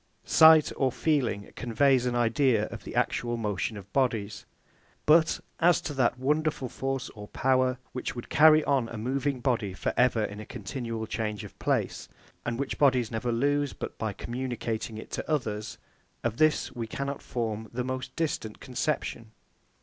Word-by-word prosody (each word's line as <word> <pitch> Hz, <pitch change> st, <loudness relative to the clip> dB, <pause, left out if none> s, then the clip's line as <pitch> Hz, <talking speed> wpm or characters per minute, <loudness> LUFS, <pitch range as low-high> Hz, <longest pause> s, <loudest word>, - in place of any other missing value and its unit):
Sight 160 Hz, -1 st, +7 dB
or 130 Hz, -2 st, +2 dB
feeling 125 Hz, -10 st, 0 dB
conveys 125 Hz, +1 st, +2 dB
an 120 Hz, -, -1 dB
idea 120 Hz, -1 st, +3 dB
of -, -, -8 dB
the -, -, -8 dB
actual 120 Hz, -1 st, 0 dB
motion 105 Hz, 0 st, -2 dB
of 100 Hz, 0 st, -12 dB
bodies; 110 Hz, -6 st, 0 dB, 0.6 s
but 160 Hz, +1 st, +5 dB, 0.2 s
as 175 Hz, 0 st, +5 dB
to 145 Hz, -, -4 dB
that 130 Hz, -2 st, +2 dB
wonderful 150 Hz, 0 st, 0 dB
force 135 Hz, 0 st, -3 dB
or 105 Hz, -2 st, -10 dB
power, 130 Hz, +1 st, +2 dB
which 125 Hz, -, -4 dB
would 120 Hz, -, -7 dB
carry 155 Hz, +1 st, +6 dB
on 130 Hz, -5 st, +1 dB
a 115 Hz, -, -6 dB
moving 130 Hz, +3 st, -1 dB
body 115 Hz, -7 st, 0 dB
for -, -, -2 dB
ever 125 Hz, -3 st, +3 dB
in 105 Hz, 0 st, -4 dB
a -, -, -6 dB
continued 115 Hz, -4 st, -5 dB
change 105 Hz, -2 st, -3 dB
of -, -, -10 dB
place, -, -, -1 dB, 0.4 s
and 115 Hz, 0 st, -1 dB
which 140 Hz, +1 st, -3 dB
bodies 130 Hz, -5 st, +3 dB
never 120 Hz, +2 st, -1 dB
lose 145 Hz, +3 st, +1 dB
but -, -, -6 dB
by 110 Hz, -1 st, -1 dB
communicating 120 Hz, -1 st, -4 dB
it 110 Hz, -, -9 dB
to -, -, -4 dB
others; 110 Hz, -8 st, -2 dB, 0.5 s
of 120 Hz, -1 st, -1 dB
this 155 Hz, -1 st, +2 dB
we 115 Hz, -2 st, -4 dB
cannot 140 Hz, +4 st, -4 dB
form 110 Hz, -2 st, -3 dB
the 125 Hz, +1 st, -2 dB
most 130 Hz, +1 st, -4 dB
distant 140 Hz, -9 st, -2 dB
conception. 125 Hz, -3 st, -3 dB
125 Hz, 165 wpm, -28 LUFS, 110-140 Hz, 0.6 s, Sight